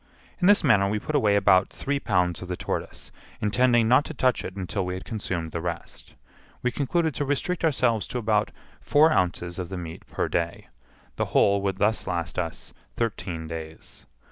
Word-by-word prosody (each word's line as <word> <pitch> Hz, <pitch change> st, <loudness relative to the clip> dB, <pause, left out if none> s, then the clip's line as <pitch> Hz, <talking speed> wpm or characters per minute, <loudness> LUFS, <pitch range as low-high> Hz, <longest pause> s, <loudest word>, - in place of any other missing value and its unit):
In 180 Hz, -, +3 dB
this 205 Hz, 0 st, +6 dB
manner 100 Hz, -2 st, +4 dB
we 105 Hz, -, 0 dB
put 155 Hz, -, -5 dB
away 110 Hz, -8 st, +3 dB
about 95 Hz, -2 st, +4 dB
three 140 Hz, 0 st, -2 dB
pounds 90 Hz, -, 0 dB
of 90 Hz, -, -7 dB
the 90 Hz, 0 st, -4 dB
tortoise, -, -, -5 dB, 0.3 s
intending 120 Hz, +2 st, +3 dB
not 130 Hz, +5 st, +5 dB
to 160 Hz, -, -7 dB
touch 130 Hz, -1 st, +1 dB
it 90 Hz, -, -6 dB
until 95 Hz, +1 st, -3 dB
we 90 Hz, 0 st, -3 dB
had 95 Hz, -, -7 dB
consumed 95 Hz, -7 st, -4 dB
the 85 Hz, -, -3 dB
rest. 85 Hz, 0 st, -6 dB, 0.5 s
We 125 Hz, -, +1 dB
concluded 160 Hz, +4 st, 0 dB
to 145 Hz, -, -2 dB
restrict 145 Hz, +6 st, -1 dB
ourselves 125 Hz, -8 st, +2 dB
to -, -, -4 dB
about 110 Hz, -2 st, +1 dB, 0.3 s
four 155 Hz, +2 st, +4 dB
ounces 90 Hz, -, 0 dB
of 90 Hz, -2 st, -4 dB
the 95 Hz, -, -5 dB
meat 85 Hz, -2 st, -8 dB
per -, -, -2 dB
day; 85 Hz, 0 st, -2 dB, 0.5 s
the -, -, +1 dB
whole 100 Hz, 0 st, +4 dB
would 95 Hz, -1 st, -1 dB
thus 110 Hz, +2 st, +1 dB
last 85 Hz, 0 st, -2 dB
us 85 Hz, -2 st, -5 dB, 0.2 s
thirteen 90 Hz, -8 st, -3 dB
days. 80 Hz, -1 st, -9 dB
100 Hz, 190 wpm, -26 LUFS, 90-125 Hz, 0.5 s, this